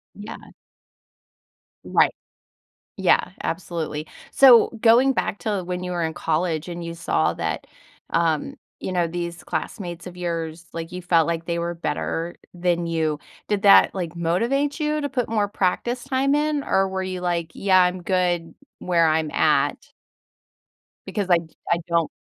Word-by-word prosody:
Yeah. 205 +1 -10 1.3
Right. - - +3 0.8
Yeah, - - +2
absolutely. 165 -3 -3 0.2
So, 255 -4 +7
going 245 +4 +5
back 205 - -2
to 205 -5 -2
when 180 0 -4
you 180 - -4
were 175 -1 -2
in 160 -1 -2
college 160 0 -1
and 175 -1 -6
you 170 0 -5
saw 85 - 0
that, - - -3 0.4
um, 165 -3 0 0.3
you 185 - -4
know, 175 -2 +1
these 170 0 -5
classmates 175 -5 -5
of 180 0 -9
yours, 165 -1 -4
like, 165 +1 -6
you 180 0 -6
felt 170 -2 +3
like 165 -1 -2
they 170 0 -1
were 170 0 -2
better 170 0 -3 0.2
than 175 -1 0
you, 160 -2 0 0.3
did 205 -1 0
that, 200 -1 +7
like, 175 -4 -4
motivate 235 - 0
you 305 -1 0
to 285 - -2
put 250 -3 -2
more 210 -2 +1
practice 235 +5 -1
time 270 +1 +1
in, 300 -1 0
or 195 -7 +1
were 190 0 -3
you 185 -1 -4
like, 170 -2 -1
"Yeah, 190 -2 +4
I'm 180 0 0
good 175 -2 0 0.2
where 170 -2 +2
I'm 155 -1 +1
at?" - - +1 1.2
Because 205 -3 -3
I 175 - +6
d 165 -1 -12
I 170 - +3
don't 170 -2 +2
175 Hz, 160 wpm, -23 LUFS, 165-200 Hz, 1.3 s, So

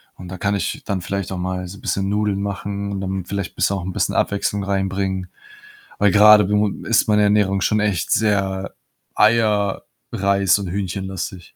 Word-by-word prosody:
Und 90 -1 -10
da 95 - -7
kann 100 +2 0
ich 100 - -3
dann 100 -2 -2
vielleicht 100 +1 -4
auch 95 - -3
mal 90 0 -3
so 100 +2 -10
bisschen 95 0 -1
Nudeln 105 -1 0
machen 100 0 -4
und 100 -1 -4
dann 95 -1 -3
vielleicht 100 -2 -4
bisschen, 100 - +1
auch 95 - -6
'n 95 - -3
bisschen - - -1
Abwechslung 100 0 0
reinbringen. 95 -1 -2 0.7
Weil 105 - +4
grade 105 0 +7
bu 105 +1 +2 0.2
ist 115 0 +2
meine 105 -1 +3
Ernährung 100 -2 +2
schon 105 +3 +1
echt 105 -5 -1
sehr 95 -3 0 0.4
Eier, 105 -3 +2 0.3
Reis 100 -1 +2
und 100 -3 -5
Hühnchenlastig. 95 -1 -5
100 Hz, 175 wpm, -20 LUFS, 95-105 Hz, 0.7 s, grade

